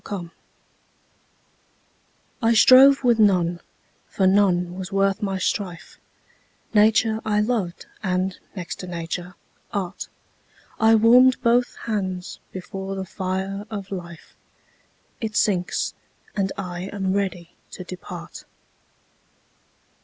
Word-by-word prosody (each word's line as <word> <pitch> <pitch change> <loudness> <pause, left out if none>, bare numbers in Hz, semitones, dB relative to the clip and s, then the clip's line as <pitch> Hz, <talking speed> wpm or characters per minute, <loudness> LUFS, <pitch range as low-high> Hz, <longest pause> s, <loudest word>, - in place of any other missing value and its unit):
9 200 -2 -3
Autoplay 170 -1 -10 2.1
I 230 0 +3
strove 270 +4 +7
with 240 -2 +3
none, 180 -5 +3 0.5
for 190 - 0
none 185 -2 +3
was 190 +1 -6
worth 195 0 +1
my 195 -2 -1
strife: 185 -1 -3 0.7
Nature 220 +1 +3
I 210 -1 +1
loved, 210 -5 -1 0.2
and, 185 -1 -1 0.2
next 175 -3 -6
to 185 - -7
Nature, 175 +1 -5 0.4
Art: 195 -2 -4 0.7
I 225 0 +5
warm'd 250 +4 +6
both 240 +1 +2
hands 190 -5 -3
before 190 +1 -6
the 190 0 -4
fire 190 +2 -4
of 200 -3 -6
Life; 170 -4 -8 0.9
It 220 -2 -4
sinks; 180 -4 0 0.4
and 195 -2 0
I 180 -2 -5
am 195 -2 -1
ready 185 -4 -2 0.2
to 185 - -8
depart. 185 0 -9
195 Hz, 110 wpm, -23 LUFS, 180-215 Hz, 2.1 s, strove